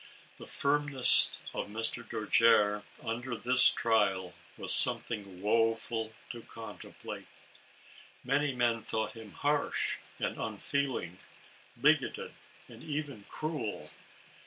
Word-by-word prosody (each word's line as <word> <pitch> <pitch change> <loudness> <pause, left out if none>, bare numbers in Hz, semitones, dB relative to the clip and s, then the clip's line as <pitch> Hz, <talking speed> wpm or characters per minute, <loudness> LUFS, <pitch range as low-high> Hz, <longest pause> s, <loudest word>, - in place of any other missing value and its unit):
The - - -11
firmness 145 -2 +3 0.2
of - - -5
Mr. 110 +2 -3
Dojere, 105 -1 +1 0.2
under 120 +1 -5
this 125 +2 +9
trial, 100 -5 -1 0.2
was - - +2
something 100 -5 +4
woeful 115 0 -1 0.2
to 120 - -10
contemplate. 115 0 -11 1.0
Many 140 +1 -1
men 120 -2 0
thought 110 0 -4
him 110 -3 -13
harsh 145 0 -1 0.2
and - - -5
unfeeling, 110 -4 -4 0.6
bigoted - - 0 0.3
and - - -14
even 145 -8 -6
cruel. 150 -9 -6
115 Hz, 100 wpm, -29 LUFS, 105-130 Hz, 1.0 s, this